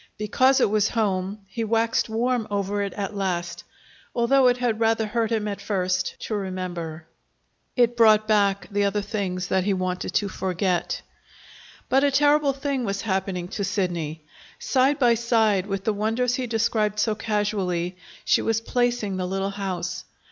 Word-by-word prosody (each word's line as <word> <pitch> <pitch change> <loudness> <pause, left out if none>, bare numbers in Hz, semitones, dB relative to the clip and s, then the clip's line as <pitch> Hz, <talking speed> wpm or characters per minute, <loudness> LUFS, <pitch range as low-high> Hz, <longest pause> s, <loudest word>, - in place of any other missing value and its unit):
Because 255 +6 +3
it - - +3
was 215 0 +2
home, 200 -2 -1
he 195 +4 -4
waxed 225 +1 +1
warm 235 +1 0
over 205 0 -1
it 200 -1 -2
at 200 +1 -4
last, 175 -3 -2 0.5
although 255 +2 +4
it 245 0 +3
had 240 -3 0
rather 225 -1 +2
hurt 225 +1 -1
him 215 -2 0
at 200 -1 -4
first 185 -2 -1
to - - -4
remember. 180 -5 -4 0.7
It 240 -1 +3
brought 215 -2 +5
back 200 -2 +2
the 205 0 +1
other 200 +1 0
things 190 -4 -3
that 190 -1 +2
he 200 -1 +1
wanted 185 0 -3
to 205 - +2
forget. 185 -2 -1 0.8
But 270 +1 +3
a 285 - +4
terrible 290 +1 +3
thing 275 -1 -2
was 200 -2 -2
happening 190 -3 -2
to 205 - -3
Sidney. 170 -6 -2 0.3
Side 265 +2 +2
by 245 -5 +4
side 220 -4 +2
with 195 -1 -3
the 220 - +1
wonders 225 +4 0
he 250 -1 -2
described 220 -2 0
so 215 +1 +2
casually, 205 -5 -1 0.3
she - - +3
was 225 -1 +1
placing 240 -4 -1
the 185 -1 -2
little 195 +1 -2
house. 185 -3 -4
210 Hz, 165 wpm, -24 LUFS, 190-230 Hz, 0.8 s, brought